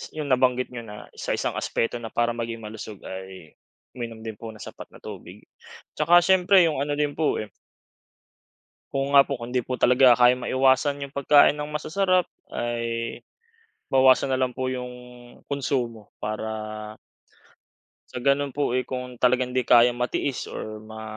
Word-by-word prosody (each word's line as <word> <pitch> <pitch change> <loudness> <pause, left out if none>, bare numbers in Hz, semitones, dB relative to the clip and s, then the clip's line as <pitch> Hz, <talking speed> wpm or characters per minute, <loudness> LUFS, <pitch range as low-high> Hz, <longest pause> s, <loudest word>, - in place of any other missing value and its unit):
Yung 155 -2 -4
nabanggit 125 0 +2
niyo 120 -2 -7
na 105 -1 -11
sa - - -2
isang - - -2
aspeto 120 +1 -1
na 115 - -6
para 120 0 +1
maging 115 -1 -5
malusog 105 -1 -8
ay 95 -4 -9 0.4
uminom 115 -2 -6
din 110 -2 -7
po 115 -1 -8
ng 110 - -13
sapat - - -9
na - - -15
tubig. - - -10 0.5
Tsaka 170 +3 +6
siyempre 190 +1 +5
yung 160 -4 0
ano 145 +1 -1
din 145 0 -1
po, 160 - +1
eh 105 - -8 1.5
Oo 135 +1 -1
nga 140 -1 +7
po, 140 - -2
kung 120 0 -8
hindi 125 - +1
po 125 +1 -3
talaga 125 0 +5
kayang 125 +1 +3
maiwasan 135 +2 +2
yung 140 - -8
pagkain 145 +1 +5
ng 150 - -3
masasarap 180 +5 +1 0.3
ay 115 -1 -3 0.7
bawasan 130 +1 +4
na 130 - +1
lang 130 -1 0
po 130 +1 -2
yung 125 -1 -4 0.6
konsumo 125 -6 -3
para 110 0 -5 1.2
sa 125 - -5
gano'n 140 0 +1
po, 145 -4 0
eh, 130 0 -1
kung 125 -1 -6
talagang 125 0 +2
'di 125 0 -1
kayang 120 0 +5
matiis 125 +2 -2
or 110 0 -7
ma 110 0 -10
125 Hz, 165 wpm, -25 LUFS, 115-140 Hz, 1.5 s, nga